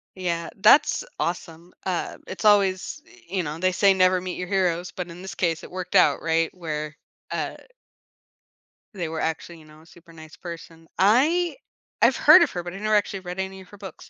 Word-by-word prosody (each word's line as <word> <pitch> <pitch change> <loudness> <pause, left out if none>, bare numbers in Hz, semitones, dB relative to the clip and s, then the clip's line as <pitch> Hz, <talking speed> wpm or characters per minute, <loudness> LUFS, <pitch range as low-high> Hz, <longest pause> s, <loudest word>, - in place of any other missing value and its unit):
Yeah, 170 -3 -3
that's 220 - +5
awesome, 170 0 -4
uh, 185 -2 -3
it's 190 - -7
always, 200 +5 +2
y - - -20
you 185 0 -1
know, 150 +1 -5
they 185 +1 +2
say 195 +2 +4
"Never 185 0 +3
meet 180 0 -5
your 180 - -5
heroes," 180 -2 0
but 180 -1 -6
in 170 +1 -10
this 190 - -8
case, 165 -3 -1
it - - -11
worked 185 0 -6
out, - - +4
right, 165 0 0
where, 155 -3 -5 0.3
uh - - -3 1.4
they 175 -4 -3
were 160 0 -4
actually, 165 +1 -4
you 155 - -17
know, 155 0 -17
a - - -20
super 170 0 -18
nice 160 -1 -13
person 165 -1 -10
I 295 - +3 0.5
I've - - +4
heard - - +8
of - - +3
her, 175 - -5
but 175 0 -7
I - - -7
never 215 +1 +1
actually 205 -2 0
read 180 0 -7
any 190 0 -5
of 185 - -16
her 205 - -14
books, 195 -4 -11
180 Hz, 205 wpm, -24 LUFS, 165-190 Hz, 1.4 s, heard